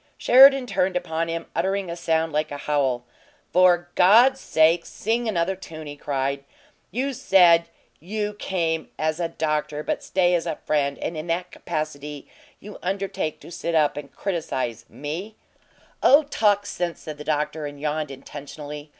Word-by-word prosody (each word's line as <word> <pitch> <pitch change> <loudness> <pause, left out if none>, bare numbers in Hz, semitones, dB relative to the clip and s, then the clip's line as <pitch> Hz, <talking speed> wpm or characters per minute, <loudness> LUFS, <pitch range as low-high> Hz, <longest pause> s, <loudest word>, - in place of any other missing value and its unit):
Sheridan 270 +1 +7
turned 185 -6 0
upon 165 -2 -1
him, 165 0 -4
uttering 190 +2 0
a 170 - -4
sound 160 -2 0
like 155 +1 0
a 145 - -5
howl. 140 -4 0 0.5
"For 175 -1 +4
God's 240 +8 +6
sake, 165 +2 +3
sing 230 +2 -2
another 190 -2 0
tune!" 160 -4 -10
he 145 0 -7
cried. 140 -1 -2 0.5
"You 270 +3 -2
said 170 -7 +5 0.3
you 210 +4 -3
'came 165 -5 -2
as 155 +1 -1
a 170 - 0
doctor 150 -2 -2
but - - -2
stay 180 -1 +1
as 175 -1 0
a 160 - -1
friend,' 140 -2 -1
and 165 - -4
in 155 +2 -5
that 180 +2 -2
capacity 150 -3 -5 0.3
you 210 +1 -11
undertake 190 -4 -3
to - - -12
sit 170 0 -3
up 150 -2 +3
and 145 -1 -8
criticize 130 - -3
ME 170 +9 -6 0.4
" - - -32
"Oh, 285 +4 +6
talk 210 -8 +1
sense," 175 -4 -3
said 150 -1 -8
the - - -6
doctor, 150 0 -1
and 145 0 -10
yawned 150 0 -2
intentionally. 145 +2 -9
165 Hz, 165 wpm, -24 LUFS, 150-190 Hz, 0.5 s, Sheridan